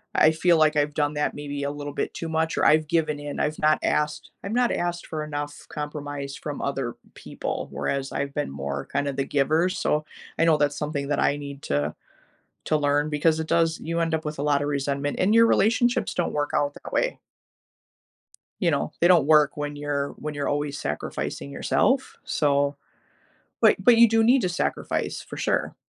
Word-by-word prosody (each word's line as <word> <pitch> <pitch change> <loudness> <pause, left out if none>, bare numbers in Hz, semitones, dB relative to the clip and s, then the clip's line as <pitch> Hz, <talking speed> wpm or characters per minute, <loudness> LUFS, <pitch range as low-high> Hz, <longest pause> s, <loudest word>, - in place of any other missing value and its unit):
I 155 - +6
feel 170 +2 +3
like 155 -1 +4
I've 145 0 +1
done 145 -1 +1
that 150 0 -1
maybe 145 -1 -5
a 140 - -1
little 145 0 -6
bit - - -3
too 165 - -4
much, 160 0 0
or - - +2
I've 155 0 +4
given 155 -2 0
in, 145 0 -6
I've 150 +1 -1
not 155 0 +4
asked 150 0 -1
I've 200 - -5
not 245 0 +2
asked 175 0 -2
for 155 -1 -4
enough 145 -1 -6
compromise 145 -2 -5
from 145 -2 -6
other 135 -4 -2 0.2
people, - - -5
whereas 135 0 -2
I've 140 0 -3
been 145 - -2
more 70 0 -4
kinda 140 0 -2
the 135 - -1
giver, 155 +6 +2
so 155 -4 0 0.3
I 165 - +4
know 160 -2 +4
that's 145 -1 +1
something 145 -2 -3
that 145 - 0
I 145 - +2
need 140 -1 -8
to 75 +1 -1 0.7
to 155 - +2
learn 145 0 +1
because 155 +2 +2
it 160 - -3
does 165 -1 +2
you 165 +1 -2
end 165 -1 0
up 160 - -4
with 150 -1 -4
a - - -1
lotta 145 -1 +2
resentment, 140 0 -2
and 200 +4 +3
your 230 0 +7
relationships 235 +3 +2
don't 175 - -1
work 145 0 -1
out 145 0 +1
that - - -10
way. - - 0 1.4
You - - +3
know, 75 - -1
they 175 - +5
don't 170 -6 +5
work 150 -1 +4
when 145 0 -4
you're 145 -1 -2
when 150 0 -5
you're 145 -1 -2
always 145 0 -2
sacrificing 70 -1 -4
yourself, - - +1
so 140 -1 +1 0.9
but - - +6
but 245 -2 +6
you 235 0 +8
do 225 0 +3
need 250 +3 +5
to 185 - 0
sacrifice, 175 - -2
for - - -10
sure. - - -1
150 Hz, 200 wpm, -25 LUFS, 145-160 Hz, 1.4 s, you